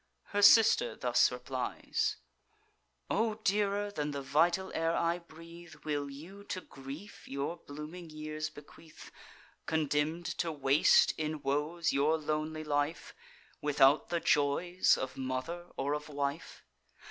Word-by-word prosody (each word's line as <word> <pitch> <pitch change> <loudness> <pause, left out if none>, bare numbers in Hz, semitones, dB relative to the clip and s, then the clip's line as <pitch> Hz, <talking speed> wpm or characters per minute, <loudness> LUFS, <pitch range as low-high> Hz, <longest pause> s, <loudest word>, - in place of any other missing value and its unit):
Her 205 - +2
sister 230 - +6
thus - - +3
replies: - - -2 0.9
"O 220 -1 +1
dearer 205 -1 0
than 150 -6 -2
the 140 -1 -4
vital 170 +7 +2
air 165 +1 0
I 170 +1 +1
breathe, 170 0 -13
Will 145 -2 -2
you 170 +9 -11
to 185 - -4
grief 140 +9 -10
your 140 +5 -3
blooming 155 +4 -8
years 155 0 -5
bequeath, 155 +2 -14 0.6
Condemn'd 155 +2 0
to 170 - 0
waste 140 0 +4
in 155 -1 -3
woes 155 +5 0
your 150 +3 +3
lonely 155 +1 -3
life, 145 +2 -2 0.5
Without 145 0 +4
the 170 - 0
joys 165 +5 +2
of 130 - -5
mother 135 +7 -4
or 140 +2 0
of 150 +1 -4
wife? 140 +2 -4
155 Hz, 125 wpm, -32 LUFS, 145-175 Hz, 0.9 s, sister